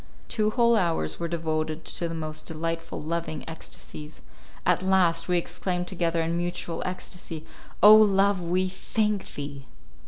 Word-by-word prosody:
Two 215 0 +1
whole 235 +1 +4
hours 165 - 0
were 170 - -1
devoted 160 -1 -2
to 170 - -2
the 165 - -4
most 155 -1 -5
delightful, 165 +1 -3
loving 165 -1 -3
ecstasies. 155 -1 -8 0.4
At - - +3
last 185 -3 +3
we 180 -1 +2
exclaimed 180 +1 -2
together 170 -3 0
in 165 +1 -1
mutual 175 -1 -3
ecstasy, 180 -3 -6 0.4
"O 210 +1 +11
Love, 200 -2 +5
we 180 +2 +1
thank 210 +2 -1
thee!" 140 -1 -6
170 Hz, 145 wpm, -27 LUFS, 160-185 Hz, 0.4 s, O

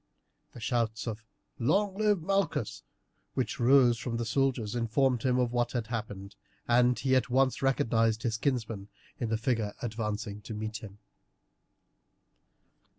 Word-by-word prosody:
The - - -10
shouts 115 -2 -1
of 115 -1 -5 0.4
"Long 190 - +2
live 205 -4 +2
Malchus!" 150 - 0 0.5
which - - -2
rose 120 -1 +5
from 115 -1 -3
the 120 - -2
soldiers 120 -3 0
informed 120 +1 +1
him 125 0 +2
of 125 -2 +1
what 120 -1 0
had 120 -3 -1
happened, 105 -4 -5 0.3
and 125 +1 +4
he 130 -1 +2
at 130 - +2
once 130 +1 +2
recognized 115 -4 +2
his 115 -2 0
kinsman 115 -7 -2 0.3
in 120 - -1
the 110 - +1
figure 110 -3 -1
advancing 105 -2 -4
to 110 +1 -7
meet 110 0 -4
him. 100 -2 -11
120 Hz, 145 wpm, -30 LUFS, 110-130 Hz, 0.5 s, rose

